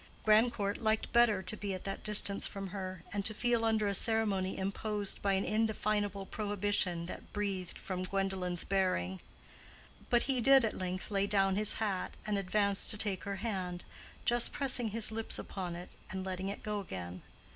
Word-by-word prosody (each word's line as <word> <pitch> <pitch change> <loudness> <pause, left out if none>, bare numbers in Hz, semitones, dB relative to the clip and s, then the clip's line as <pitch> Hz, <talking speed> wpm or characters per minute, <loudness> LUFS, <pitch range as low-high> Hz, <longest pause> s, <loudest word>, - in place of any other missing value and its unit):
Grandcourt 215 -2 +3
liked 220 -1 0
better 230 -5 +4
to 185 +3 +1
be 200 -2 -3
at 185 - -8
that 195 - -5
distance 205 -1 +4
from 195 -1 -6
her, 185 -2 -6
and 200 -1 -1
to 215 +1 0
feel 240 0 +1
under 220 -1 +2
a 200 - 0
ceremony 200 -3 +2
imposed 200 +1 -2
by 200 -1 +2
an 190 0 +1
indefinable 210 -2 0
prohibition 205 -4 -1
that 180 - -9
breathed 195 -4 -3
from 185 -1 -4
Gwendolen's 185 -2 -2
bearing. 140 - 0 0.9
But 240 -1 +4
he 260 -2 0
did 270 0 +7
at 220 - -2
length 185 +2 -4
lay 200 0 +1
down 195 -2 +3
his 210 +1 +4
hat 200 -4 -2
and 210 -1 0
advance 200 +1 +2
to 215 - -1
take 200 -3 -1
her 200 0 -3
hand, 180 -5 -3 0.4
just 240 0 +3
pressing 255 -4 +2
his 220 +1 +3
lips 225 0 -2
upon 180 -3 -5
it 175 +1 -8 0.2
and 190 0 -4
letting 190 0 -3
it 200 - -6
go 210 -1 -2
again. 90 - -7
200 Hz, 180 wpm, -33 LUFS, 185-215 Hz, 0.9 s, did